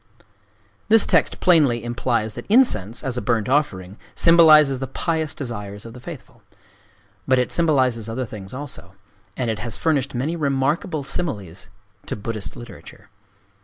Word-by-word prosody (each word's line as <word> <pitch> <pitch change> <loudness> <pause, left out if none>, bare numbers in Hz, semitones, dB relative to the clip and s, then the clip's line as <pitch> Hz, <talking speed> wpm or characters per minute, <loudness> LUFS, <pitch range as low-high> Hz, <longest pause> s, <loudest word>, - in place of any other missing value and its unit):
This 225 0 +6
text - - +2
plainly 145 -10 +3
implies 120 -2 -1
that - - -9
incense, 120 - +2
as 130 -2 -2
a - - -1
burnt 110 -1 0
offering, 105 -9 -1 0.2
symbolizes 155 -5 +6
the 135 - -4
pious 160 0 -2
desires 105 -6 -6
of 115 - -10
the 125 - -11
faithful. 145 +2 -11 0.9
But 130 - +3
it 125 - 0
symbolizes 130 -9 +1
other 125 +3 -3
things 100 -4 -10
also; 130 -9 -8 0.4
and 120 -3 -1
it 110 - -5
has 115 0 -5
furnished 145 -4 0
many 145 +7 -2
remarkable 145 +2 -1
similes 105 - -4 0.4
to - - -3
Buddhist 105 -1 -5
literature. 120 -3 -13
125 Hz, 145 wpm, -22 LUFS, 110-150 Hz, 0.9 s, This